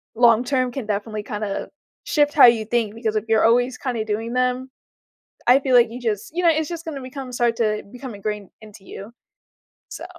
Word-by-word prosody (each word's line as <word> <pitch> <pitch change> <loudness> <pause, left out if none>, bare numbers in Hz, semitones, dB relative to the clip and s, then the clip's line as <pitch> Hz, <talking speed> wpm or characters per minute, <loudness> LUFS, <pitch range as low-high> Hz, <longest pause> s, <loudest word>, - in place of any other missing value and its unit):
long 235 0 +5
term 255 -1 0
can 255 -2 -5
definitely 210 +1 -3
kinda 210 -1 -4 0.4
shift 295 -1 +2
how 285 - +8
you 235 -2 +5
think 225 -1 -1
because 225 -2 -2
if 215 - -3
you're 220 -1 +3
always 245 +2 +2
kinda 240 -5 -3
doing 220 +2 -3
them, 250 +1 0 0.8
I 255 +3 +6
feel 265 -2 0
like 240 -1 +6
you 245 +2 -8
just 220 -3 -3
you 355 - -1
know, 340 - +6
it's 315 -1 0
just 335 -1 -6
gonna 310 -5 -6
become 260 0 -8
start 240 -1 +1
to 215 -2 0
become 250 -2 -8
ingrained 210 -1 -5
into 210 -2 -14
you. 200 +3 -10 0.8
So - - -8
235 Hz, 200 wpm, -22 LUFS, 215-255 Hz, 0.8 s, how